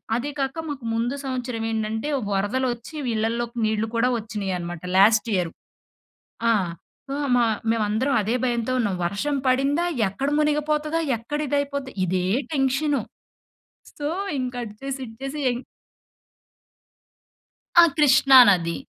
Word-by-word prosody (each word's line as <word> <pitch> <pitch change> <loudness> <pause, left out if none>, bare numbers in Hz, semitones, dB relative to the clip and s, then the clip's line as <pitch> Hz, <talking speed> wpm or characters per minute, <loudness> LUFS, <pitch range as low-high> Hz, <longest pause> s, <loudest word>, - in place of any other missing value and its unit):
అదీ 270 +5 -2
కాక 275 +4 -2
మాకు 275 -5 -6
ముందు 235 +4 -1
సంవత్సరవేంటంటే, 225 -2 -2 0.2
వరదలొచ్చి 240 +7 -1
వి - - -1
ఇళ్లల్లోకి 235 +2 -2
నీళ్ళు 215 0 0
కూడా 235 +2 +3
ఒచ్చినియనమాట 185 -6 -4
లాస్ట్ 220 +3 +5
ఇయరు. 175 -3 -1 1.0
ఆ! - - +5 0.6
ఆ! - - -2 0.2
మా 240 - +4 0.3
మేవందరం 225 +5 +1
అదే 220 +4 -1
భయంతో 240 0 0
ఉన్నాం. 205 -5 0
వర్షం 280 +11 -1
పడిందా, 275 +6 +2 0.2
ఎక్కడ 270 +9 -3
మునిగిపోతదా, 300 +1 0 0.2
ఎక్కడ 265 +7 -4
ఇదయిపోద్దా, 280 -1 -2
ఇదే 180 0 0 0.3
టెన్షను. 275 +1 +1 1.0
సో, 290 0 -2 0.3
ఇంక 255 -1 -3
అటు 210 -2 -9
చేసి 275 0 -4
ఇటు 225 - -12
చేసి 270 +2 -4
య - - +3 2.3
ఆ! - - +8
కృష్ణా 270 -2 +5
నది. 170 -3 +2
245 Hz, 120 wpm, -24 LUFS, 215-280 Hz, 2.3 s, ఆ